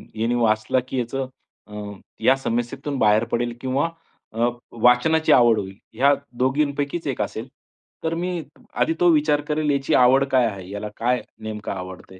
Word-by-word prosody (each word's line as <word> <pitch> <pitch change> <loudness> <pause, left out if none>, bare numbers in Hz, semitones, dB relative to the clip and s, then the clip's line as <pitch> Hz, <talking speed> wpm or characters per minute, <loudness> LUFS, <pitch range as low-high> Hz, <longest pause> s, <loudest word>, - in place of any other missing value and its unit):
यांनी 115 +2 0
वाचला, 110 +1 +2
की 130 - -2
याचं 130 +2 -3 0.4
अ, 105 - -14 0.5
या 130 - +5
समस्येतून 135 +3 -3
बाहेर 105 +1 +4
पडेल 120 0 0
किंवा 135 +5 0 0.4
अ, 115 +2 +1 0.3
वाचनाची 140 +7 +4
आवड 120 -4 +6
होईल. 95 -1 -7 0.2
या 135 +5 +4 0.2
दोघींपैकीच 145 +4 0
एक 130 -6 -2
असेल. 110 +4 -4 0.6
तर 160 0 -1
मी 180 -1 -2 0.3
आधी 165 - +2
तो 175 - +4
विचार 150 -2 +3
करेल 150 0 0
याची 140 -1 0
आवड 130 +2 +5
काय 130 -2 +4
आहे? 95 -5 -5
याला 105 +1 -5
काय 125 +1 +1 0.2
नेमकं 105 -1 -5
आवडतंय. 95 0 -8
125 Hz, 160 wpm, -23 LUFS, 110-140 Hz, 0.6 s, आवड